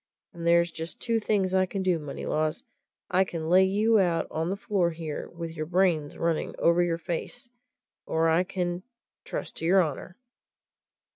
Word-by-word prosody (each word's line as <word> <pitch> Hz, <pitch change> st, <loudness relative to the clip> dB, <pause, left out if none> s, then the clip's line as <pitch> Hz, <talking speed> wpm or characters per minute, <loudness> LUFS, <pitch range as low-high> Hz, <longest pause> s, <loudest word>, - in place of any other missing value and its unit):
And 170 Hz, -1 st, -5 dB
there's 170 Hz, 0 st, +4 dB
just 160 Hz, +1 st, -6 dB
two 230 Hz, -1 st, 0 dB
things 200 Hz, -3 st, 0 dB
I 185 Hz, 0 st, +3 dB
can 190 Hz, +1 st, -3 dB
do, 180 Hz, -3 st, +2 dB
Moneylaws 155 Hz, -, -2 dB, 0.5 s
I 185 Hz, +1 st, +4 dB
can 165 Hz, -3 st, -5 dB
lay 185 Hz, +1 st, +7 dB
you 210 Hz, +4 st, +3 dB
out 175 Hz, -3 st, +2 dB
on 160 Hz, +2 st, -1 dB
the 195 Hz, -, -1 dB
floor 195 Hz, -3 st, 0 dB
here, 160 Hz, -2 st, -5 dB
with 170 Hz, -1 st, -6 dB
your 155 Hz, -1 st, -5 dB
brains 175 Hz, -4 st, +1 dB
running 165 Hz, -2 st, -1 dB
over 170 Hz, +1 st, +3 dB
your 170 Hz, -1 st, +1 dB
face, 180 Hz, +8 st, -5 dB, 0.6 s
or 160 Hz, 0 st, +2 dB
I 165 Hz, +2 st, +3 dB
can 180 Hz, -2 st, -3 dB, 0.4 s
trust -, -, -5 dB
to -, -, -4 dB
your 190 Hz, +1 st, +5 dB
honour!" 170 Hz, +3 st, -6 dB
175 Hz, 170 wpm, -27 LUFS, 165-190 Hz, 0.6 s, lay